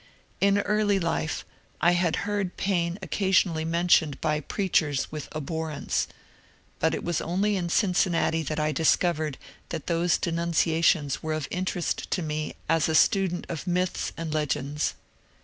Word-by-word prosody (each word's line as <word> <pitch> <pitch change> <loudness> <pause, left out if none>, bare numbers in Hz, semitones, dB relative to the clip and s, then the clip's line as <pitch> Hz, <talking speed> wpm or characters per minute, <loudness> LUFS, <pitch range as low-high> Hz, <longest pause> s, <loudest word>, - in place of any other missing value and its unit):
In 200 0 +4
early 205 0 +2
life 165 -2 -2 0.3
I 170 +2 +4
had 175 -1 +2
heard 205 -3 -2
Paine 175 -3 0
occasionally 185 -5 +2
mentioned 165 -3 +2
by 155 -1 0
preachers 155 -4 0
with 150 -2 -6
alfhorrence, 155 0 -2 0.7
but - - +2
it - - -5
was 170 -1 -1
only 195 +5 0
in 175 -3 -2
Cincinnati 175 -4 +2
that 155 0 -3
I 150 0 +1
discovered 155 -1 +1 0.3
that 150 - -5
those 170 0 +2
denunciations 165 -3 +1
were 155 0 -2
of 155 -3 -3
interest 180 -1 -2
to 180 - -1
me 155 0 -3
as 165 0 +2
a 160 - +1
student 185 0 +3
of 170 +2 -5
myths 180 0 0
and 165 -2 -4
legends. 150 -1 -1
170 Hz, 145 wpm, -26 LUFS, 155-180 Hz, 0.7 s, In